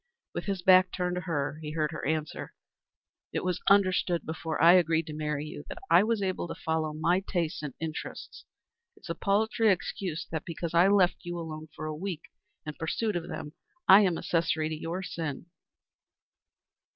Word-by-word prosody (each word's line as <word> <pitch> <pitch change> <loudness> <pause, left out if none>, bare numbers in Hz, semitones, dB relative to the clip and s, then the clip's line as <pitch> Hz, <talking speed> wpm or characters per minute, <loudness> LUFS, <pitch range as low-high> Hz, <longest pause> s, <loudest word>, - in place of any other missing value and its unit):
With - - -4
his 195 -3 -2
back 185 0 +6
turned 180 -1 -1
to - - -2
her 155 -3 -2
he 150 -1 -5
heard 155 -1 0
her 155 - -6
answer: 155 0 -3 0.8
"It - - -2
was 180 -1 -1
understood 185 -3 +3
before 160 0 -4
I 170 +1 +8
agreed 165 -3 +3
to 155 - -7
marry 150 -1 -2
you 150 -1 -8
that - - -7
I 185 - +7
was 225 +1 +1
to - - +1
be 185 - +1
free - - -4
to - - -6
follow 160 -1 -1
my 165 +4 +1
tastes 170 -3 -1
and 145 -4 -6
interests. 160 -1 -6 0.5
It - - -20
is 170 - -6
a - - 0
paltry 220 +5 +2
excuse 180 -2 -3
that, 160 -2 -3
because 170 0 -5
I 170 +2 +6
left 195 -3 +4
you 175 -1 -5
alone 155 -2 -6
for 155 - -6
a 155 - -3
week 175 -1 -5 0.4
in 150 - -4
pursuit 200 +7 -2
of 175 -1 -3
them, 150 - -6 0.3
I 195 +2 +9
am 180 -5 +2
accessory 165 -3 0
to 160 - -3
your 165 +4 -4
sin." 160 -5 -4
170 Hz, 195 wpm, -29 LUFS, 155-185 Hz, 0.8 s, I